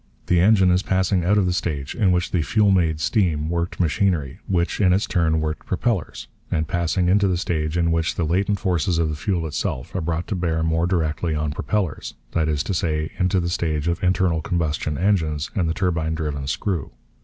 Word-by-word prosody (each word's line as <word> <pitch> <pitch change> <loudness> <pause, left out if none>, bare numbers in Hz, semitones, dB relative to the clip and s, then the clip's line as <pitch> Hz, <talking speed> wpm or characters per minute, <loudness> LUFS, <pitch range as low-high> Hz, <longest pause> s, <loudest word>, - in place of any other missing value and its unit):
The 90 - +3
engine 95 -1 +5
is 90 +1 +3
passing 95 -1 +1
out 100 +4 +3
of 100 - +3
the 90 - +1
stage 75 -6 -3
in 100 -6 +2
which 90 0 0
the 90 - +1
fuel 100 +5 +2
made 80 -5 +2
steam 80 -4 0
worked 85 0 -2
machinery, 85 -4 0
which, 90 +1 0
in 90 -2 +5
its 95 - +1
turn, 80 -3 +1
worked 75 0 -4
propellers; 95 - -2 0.2
and 80 -1 -1
passing 90 +2 0
into 100 +2 +3
the 90 -2 +1
stage 80 -2 -1
in 85 -1 +2
which 80 -1 0
the 85 - -1
latent 95 +5 +1
forces 90 -2 0
of 80 -1 +1
the 75 - -3
fuel 85 +1 -1
itself 65 -4 -3
are 90 - -2
brought 85 +1 -2
to 105 - -1
bear 80 -3 -1
more 80 +1 +1
directly 80 -2 -1
on 75 0 -1
propellers, 90 0 -2 0.2
that 80 -1 0
is 75 -2 0
to 100 - -2
say, 80 -3 -1
into 90 0 +2
the 85 - -1
stage 80 -3 -1
of 85 +2 -1
internal 90 -3 +2
combustion 80 -5 -1
engines 80 -5 0
and 90 -6 0
the - - 0
turbine 80 -4 0
driven 75 -4 -3
screw. 80 - -2
85 Hz, 210 wpm, -22 LUFS, 80-95 Hz, 0.2 s, engine